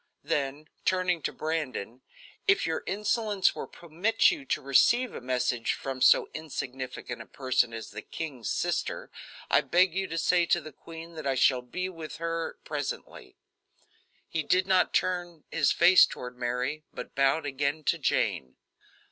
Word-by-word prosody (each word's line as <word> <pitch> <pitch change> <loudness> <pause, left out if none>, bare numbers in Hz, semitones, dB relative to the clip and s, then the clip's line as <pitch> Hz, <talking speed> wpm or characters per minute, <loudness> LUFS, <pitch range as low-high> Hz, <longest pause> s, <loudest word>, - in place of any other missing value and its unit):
Then 145 +2 -2 0.2
turning 185 -2 +1
to - - -2
Brandon: 140 -7 -3 0.5
"If 390 +1 +4
your 160 - -1
insolence 210 -1 +1
will - - -6
permit 175 - +2
you 305 -6 -5
to - - 0
receive 235 - +3
a - - -7
message 125 -2 0
from 135 -1 -5
so - - +6
insignificant 130 -5 -5
a - - -11
person 130 -3 +1
as 115 -1 -7
the 105 +1 -7
king's 135 - -6
sister, - - -2 0.4
I - - +6
beg 180 0 +3
you 190 +1 -1
to 165 - -4
say 175 +1 +3
to 175 - +3
the 155 -1 -10
queen 165 +3 -11
that 155 -3 -5
I 135 - +1
shall 130 0 +4
be 185 +10 -4
with 165 -4 -8
her 165 0 -3
presently." - - -5 0.9
He 160 - -1
did 180 +5 +2
not 190 -1 +3
turn 175 -3 -1
his 150 -4 +3
face 180 +2 +7
toward 125 0 -8
Mary, 125 +5 -2
but - - -8
bowed 135 +3 +2
again 145 +2 -1
to - - +1
Jane. 65 -1 0
155 Hz, 160 wpm, -28 LUFS, 130-180 Hz, 0.9 s, face